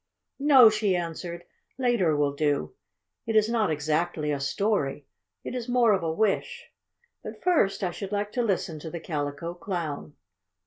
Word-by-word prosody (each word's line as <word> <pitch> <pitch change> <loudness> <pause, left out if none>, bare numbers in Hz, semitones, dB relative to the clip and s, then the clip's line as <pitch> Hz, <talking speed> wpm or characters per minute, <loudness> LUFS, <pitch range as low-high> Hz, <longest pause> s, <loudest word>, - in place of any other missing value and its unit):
"No," 270 -6 +7
she 210 -3 +1
answered. 170 0 -4 0.3
"Later 240 - +2
will 145 -1 +1
do. 145 - 0 0.5
It 225 - -1
is 215 0 +5
not 225 -4 +1
exactly 155 +1 -1
a 145 - -1
story 145 -2 -1 0.4
it - - -5
is 245 -1 -4
more 240 -3 +4
of 190 - +1
a 165 -1 -1
wish. 205 +4 -1 0.5
But - - -9
first 295 - +2
I 180 - 0
should 195 +3 -7
like 205 0 -2
to 245 - -1
listen 185 -7 -1
to 160 - -7
the 170 - -6
Calico 150 +1 -4
Clown." 170 -5 -5
175 Hz, 165 wpm, -27 LUFS, 155-215 Hz, 0.5 s, No